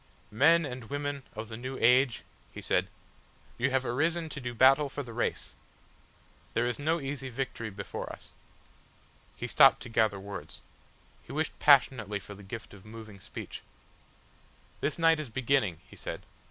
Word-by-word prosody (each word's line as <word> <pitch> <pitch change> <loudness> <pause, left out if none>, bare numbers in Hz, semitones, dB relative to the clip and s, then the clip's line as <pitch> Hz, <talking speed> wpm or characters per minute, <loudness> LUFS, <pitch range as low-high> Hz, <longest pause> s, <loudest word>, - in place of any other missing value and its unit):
"Men 155 +9 +5
and 125 -4 -7
women 145 0 -3
of 110 +1 -5
the 110 0 -7
new 130 +2 -5
age," 125 +1 +4 0.3
he - - -8
said; - - +1 0.7
"you 125 +3 +2
have 130 0 +1
arisen 160 +7 0
to 140 - -7
do 125 -1 -5
battle 135 +4 +6
for 145 +1 -5
the 120 -3 -9
race!... 120 - -2 1.0
There 120 - +2
is 120 +1 -1
no 160 +3 +1
easy 135 -2 -4
victory 125 -3 -4
before 100 -1 -6
us." - - -10 1.0
He - - -5
stopped - - +6
to - - -8
gather 110 -3 +2
words. 100 +1 -7 0.6
He - - -13
wished 155 +2 -2
passionately 125 -7 +4
for 105 - -10
the 100 - -12
gift 110 +3 -8
of 100 -2 -13
moving 110 -2 -11
speech. - - -8 1.2
"This 145 - -1
night 165 -1 +4
is 155 - -4
a - - -16
beginning," 120 - +1
he - - -14
said. - - -6
125 Hz, 165 wpm, -30 LUFS, 110-145 Hz, 1.2 s, battle